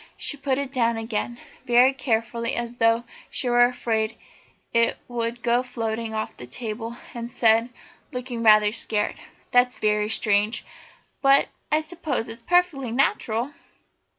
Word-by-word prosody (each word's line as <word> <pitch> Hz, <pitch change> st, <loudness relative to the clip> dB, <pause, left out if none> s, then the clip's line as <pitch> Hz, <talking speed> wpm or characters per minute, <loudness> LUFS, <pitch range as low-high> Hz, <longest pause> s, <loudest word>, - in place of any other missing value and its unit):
She -, -, -1 dB
put 275 Hz, -2 st, -1 dB
it 280 Hz, -1 st, -3 dB
down 235 Hz, -3 st, +1 dB
again 225 Hz, +1 st, -3 dB, 0.3 s
very 250 Hz, +1 st, +5 dB
carefully 230 Hz, -2 st, -1 dB
as 240 Hz, 0 st, -4 dB
though 230 Hz, 0 st, +3 dB, 0.3 s
she 255 Hz, -, -3 dB
were 240 Hz, 0 st, +6 dB
afraid 225 Hz, -3 st, -1 dB, 0.6 s
it 230 Hz, 0 st, +3 dB
would 235 Hz, 0 st, -3 dB
go 240 Hz, 0 st, +3 dB
floating 230 Hz, -2 st, -3 dB
off 215 Hz, 0 st, -4 dB
the 125 Hz, -, -10 dB
table, 225 Hz, -, -5 dB, 0.2 s
and 235 Hz, 0 st, -5 dB
said, 230 Hz, 0 st, +3 dB, 0.4 s
looking 250 Hz, -2 st, -5 dB
rather 215 Hz, -2 st, +6 dB
scared: 210 Hz, -2 st, -1 dB, 0.3 s
"That's 245 Hz, 0 st, +3 dB
very 210 Hz, 0 st, +1 dB
strange, 210 Hz, 0 st, +1 dB, 0.6 s
but 275 Hz, 0 st, +5 dB, 0.2 s
I 305 Hz, +1 st, +3 dB
suppose 315 Hz, -7 st, -3 dB
it's 230 Hz, +1 st, -8 dB
all -, -, -34 dB
perfectly 350 Hz, -9 st, +2 dB
natural?" 240 Hz, 0 st, 0 dB
235 Hz, 145 wpm, -24 LUFS, 225-250 Hz, 0.6 s, were